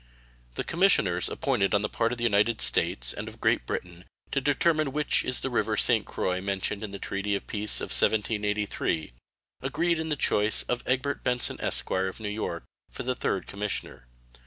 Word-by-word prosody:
The - - -2
commissioners 110 - +2
appointed 100 +1 0
on 100 - +1
the - - +1
part 115 +2 0
of 125 - -3
the 120 - -4
United 110 0 +2
States - - +4
and - - -6
of - - -9
Great - - +1
Britain 90 0 -5 0.3
to 135 - 0
determine 150 +1 +2
which 150 0 +1
is 130 - +2
the 135 - -3
river 110 -2 0
St. 110 -1 +4
Croix 90 0 -2
mentioned 100 +1 -2
in 110 - -4
the 100 - -7
treaty 100 +1 -2
of 100 - -5
peace 105 0 -1
of - - -4
1783, 105 - +1 0.5
agreed 165 +5 0
in 160 0 -3
the 150 - +1
choice 105 -6 +1
of 125 0 -2
Egbert 130 +3 -1
Benson, 125 0 0
esq., - - 0
of 95 +2 -1
New 105 -2 -4
York, 105 -5 -4 0.3
for - - -7
the 125 0 -1
3rd 95 - -2
commissioner. 100 -11 -5
105 Hz, 185 wpm, -27 LUFS, 100-130 Hz, 0.5 s, States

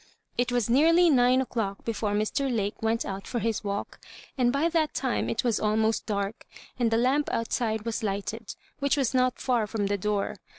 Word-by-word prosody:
It 245 0 0
was 245 -3 +1
nearly 330 +7 +5
nine 255 -1 +4
o'clock 225 -6 -3
before 215 -2 -1
Mr. 235 +6 0
Lake 205 -3 -2
went 225 +1 0
out 195 0 -5
for 245 - -3
his 225 -2 -1
walk, 200 0 -4 0.4
and 245 -3 +2
by 280 +5 +2
that 320 -2 0
time 260 -3 -1
it 225 - -1
was 235 -3 +1
almost 220 +1 +1
dark, 200 0 -3 0.3
and 235 -2 +3
the 225 - +2
lamp 265 +5 +2
outside 225 -1 -1
was 230 -1 -2
lighted, 210 +2 -4 0.2
which 280 0 +1
was 270 -4 +1
not 255 -1 +2
far 240 -5 +1
firom 205 -2 -2
the 200 0 0
door. 210 +1 -1
230 Hz, 195 wpm, -27 LUFS, 210-255 Hz, 0.4 s, nearly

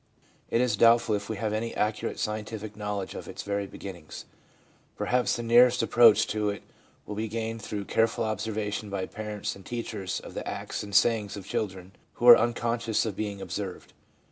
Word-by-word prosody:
It 115 - +2
is 120 -5 +1
doubtful 115 0 +5
if 100 0 -2
we 110 - -3
have 110 0 -2
any 115 +2 -2
accurate 105 0 -1
scientific 105 0 -4
knowledge 105 -2 -4
of - - -8
its - - -7
very 100 0 -2
beginnings; 90 -5 -9 0.7
perhaps 125 0 +1
the 120 - -4
nearest 120 +1 +5
approach 115 -1 +6
to 105 -1 0
it 100 - -5 0.4
will 105 - -6
be 110 +2 -2
gained 115 +1 -4
through 100 -1 -5
careful 115 +2 +1
observation 110 -1 -3
by 100 -2 -2
parents 105 -1 -5
and 100 - -13
teachers 110 -4 -4
of - - -11
the - - -5
acts - - -4
and 100 -1 -6
sayings 105 -1 +3
of 100 - -8
children 95 -3 -4 0.2
who 120 - -1
are 120 - +13
unconscious 115 -1 0
of 110 -4 -3
being 100 -2 -4
observed. 95 0 -6
105 Hz, 180 wpm, -28 LUFS, 100-115 Hz, 0.7 s, are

